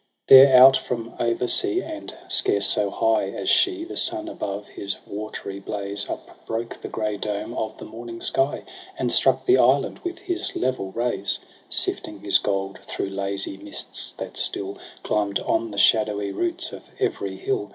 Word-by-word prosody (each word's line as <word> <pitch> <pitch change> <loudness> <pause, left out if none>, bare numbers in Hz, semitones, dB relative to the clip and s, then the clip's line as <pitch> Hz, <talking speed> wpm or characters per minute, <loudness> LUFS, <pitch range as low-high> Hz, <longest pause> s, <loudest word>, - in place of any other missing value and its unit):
4 - - +11
There, 135 -1 +8
out 130 +1 +9
from 115 -2 -5
over 120 +1 0
sea, 370 - +4
and 315 -1 -7 0.2
scarce 100 - +3
so 105 -1 +2
high 110 -2 +1
As - - -6
she, 365 -3 +2
the - - -8
sun 335 -1 0
above 100 - -5
his 100 -1 -4
watery 100 -1 -6
blaze 100 0 -2
Upbroke 115 +1 -6
the - - -6
grey 105 -1 -3
dome 105 +2 -4
of 110 -2 -4
the - - -9
morning 115 +1 -9
sky. 135 +4 0 0.3
And - - 0
struck - - +4
the 380 0 +5
island - - +3
with 350 -1 -5
his 355 -2 -4
level 125 -7 -2
rays; 115 -3 0 0.3
Sifting, 100 -2 0
his 100 -1 +4
gold 100 -1 -2
thro' - - -4
lazy 95 0 -3
mists, 100 +1 -2
that - - -7
still 100 0 -1 0.2
Climb'd 100 -2 0
on 115 - 0
the 100 - -9
shadowy 105 -1 +3
roots 345 -1 -2
of - - -11
every - - -2
hill. 395 0 -2
110 Hz, 170 wpm, -23 LUFS, 100-135 Hz, 0.3 s, 4